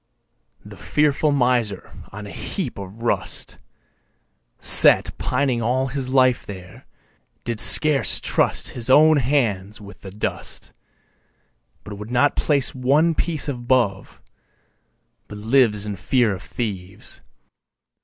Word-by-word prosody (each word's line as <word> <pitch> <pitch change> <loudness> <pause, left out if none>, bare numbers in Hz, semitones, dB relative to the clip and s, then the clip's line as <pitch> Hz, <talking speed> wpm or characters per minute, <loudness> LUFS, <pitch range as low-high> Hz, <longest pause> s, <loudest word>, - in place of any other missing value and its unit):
3. - - -14
The - - -12
fearful 150 0 0
miser 125 -7 -1 0.2
on 105 +1 -9
a 100 - -9
heap - - -5
of 100 +4 -10
rust 120 - -1 1.0
Sat - - +4
pining 125 -2 -1
all 125 +3 0
his 135 -1 -4
life 130 -2 +2
there, 95 -2 -12 0.6
did 115 -2 -4
scarce 150 +2 +4
trust - - 0
His 120 0 -4
own 155 +3 +6
hands 115 -7 -1
with 100 -1 -14
the 95 - -9
dust, 105 +3 -2 1.1
But 100 -1 -9
would 105 +1 -8
not 125 +4 +2
place 140 -4 +1
one 140 +6 +2
piece 155 -2 -1
above, 120 -6 -1 1.1
but 105 - -10
lives 110 -2 +1
In 105 -1 -5
fear 110 +5 0
of 95 - -8
thieves. 100 -5 -6
120 Hz, 125 wpm, -21 LUFS, 105-135 Hz, 1.1 s, own